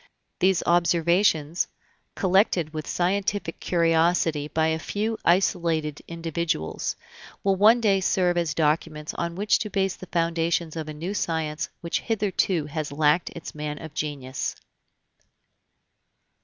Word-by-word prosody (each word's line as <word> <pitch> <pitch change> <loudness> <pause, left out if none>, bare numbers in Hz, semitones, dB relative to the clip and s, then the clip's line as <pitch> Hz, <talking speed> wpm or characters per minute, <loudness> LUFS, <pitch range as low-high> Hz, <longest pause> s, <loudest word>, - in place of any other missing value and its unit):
These 185 -1 +3
observations, 170 -1 +2 0.5
collected 185 -4 +2
with 155 -1 -5
scientific 195 0 -1
curiosity 165 -3 +2
by 160 +1 +1
a 160 0 0
few 215 +6 -2
isolated 165 -4 +1
individuals, 165 - -2 0.5
will 195 -1 +3
one 215 +5 +6
day 200 -3 +3
serve 180 -1 +2
as 170 -3 0
documents 155 0 0
on 170 0 -3
which 205 +3 +2
to 210 - -3
base 195 -2 0
the 185 - -11
foundations 165 -1 0
of 155 -1 -4
a - - -5
new 170 +6 -4
science 160 -5 -2
which 170 - -1
hitherto 195 -6 0
has 150 0 -4
lacked 150 +3 +2
its 170 - -8
man 150 -1 -4
of 160 -2 -9
genius. 140 -4 -3
170 Hz, 130 wpm, -25 LUFS, 155-185 Hz, 0.5 s, one